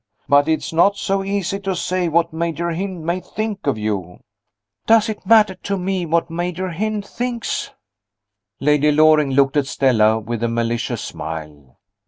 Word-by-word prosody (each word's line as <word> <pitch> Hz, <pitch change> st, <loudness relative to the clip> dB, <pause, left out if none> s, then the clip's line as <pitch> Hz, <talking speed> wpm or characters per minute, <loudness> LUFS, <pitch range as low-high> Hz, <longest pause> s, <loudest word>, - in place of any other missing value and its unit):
But 145 Hz, +1 st, +4 dB
it's 160 Hz, 0 st, -1 dB
not 195 Hz, +5 st, +4 dB
so 195 Hz, -1 st, -1 dB
easy 195 Hz, -1 st, -2 dB
to 195 Hz, -2 st, -2 dB
say 180 Hz, 0 st, -1 dB
what 165 Hz, 0 st, +1 dB
Major 170 Hz, +1 st, -2 dB
Hynd 180 Hz, 0 st, -4 dB
may 170 Hz, +2 st, 0 dB
think 205 Hz, 0 st, -5 dB
of 140 Hz, -, +1 dB
you." 100 Hz, -5 st, -3 dB, 0.7 s
"Does 225 Hz, 0 st, +5 dB
it 210 Hz, -3 st, -6 dB
matter 215 Hz, -3 st, +5 dB
to 195 Hz, +2 st, -4 dB
me 185 Hz, -1 st, -2 dB
what 165 Hz, +1 st, +1 dB
Major 180 Hz, +2 st, -3 dB
Hynd 210 Hz, +4 st, -2 dB
thinks?" 240 Hz, +1 st, -3 dB, 0.9 s
Lady 150 Hz, +1 st, +3 dB
Loring 155 Hz, -1 st, +4 dB
looked 135 Hz, +2 st, +2 dB
at 140 Hz, -2 st, +1 dB
Stella 110 Hz, -6 st, +3 dB
with 115 Hz, +1 st, -5 dB
a 120 Hz, -, +1 dB
malicious 115 Hz, 0 st, -2 dB
smile. 75 Hz, -4 st, -8 dB
165 Hz, 160 wpm, -20 LUFS, 135-195 Hz, 0.9 s, Does